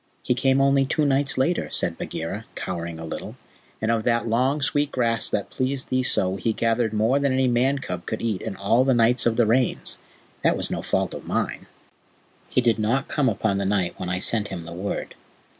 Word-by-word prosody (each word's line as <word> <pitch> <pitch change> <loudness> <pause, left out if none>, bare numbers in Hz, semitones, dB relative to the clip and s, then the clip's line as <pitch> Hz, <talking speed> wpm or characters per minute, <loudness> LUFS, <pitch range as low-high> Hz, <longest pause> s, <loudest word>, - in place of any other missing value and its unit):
"He - - +2
came 130 +2 +2
only 135 0 +4
two 150 +3 +1
nights 140 0 +1
later," 155 +7 +1
said - - 0
Bagheera, 100 +7 -5
cowering 85 -2 -4
a 80 - -7
little; 80 - -6 0.4
"and 110 +1 0
of 115 -1 0
that 115 -1 +1
long, 130 +6 +2
sweet 145 +1 +1
grass 115 -3 +1
that 100 - -2
pleased 130 +1 -2
thee 130 0 +2
so 95 -6 +1
he 110 +3 0
gathered 115 0 +1
more 110 +6 +2
than 140 -1 +1
any 130 0 +2
Man 125 +3 +2
cub 90 -10 -6
could - - -2
eat 110 -5 -2
in - - -4
all 105 +6 +3
the 130 -1 +3
nights 120 +1 +3
of 115 - +2
the 120 - +4
Rains. 120 +3 0 0.4
That - - +2
was - - 0
no - - -2
fault - - 0
of - - -8
mine." - - -2 0.8
"He - - +2
did 115 -3 +2
not 120 +6 0
come 145 -4 +2
upon 100 -1 0
the - - 0
night 95 -3 0
when 90 - -4
I 90 - 0
sent 105 +2 +1
him 90 -3 -6
the 85 +1 -8
word. 95 +4 -4
115 Hz, 215 wpm, -24 LUFS, 100-130 Hz, 0.8 s, only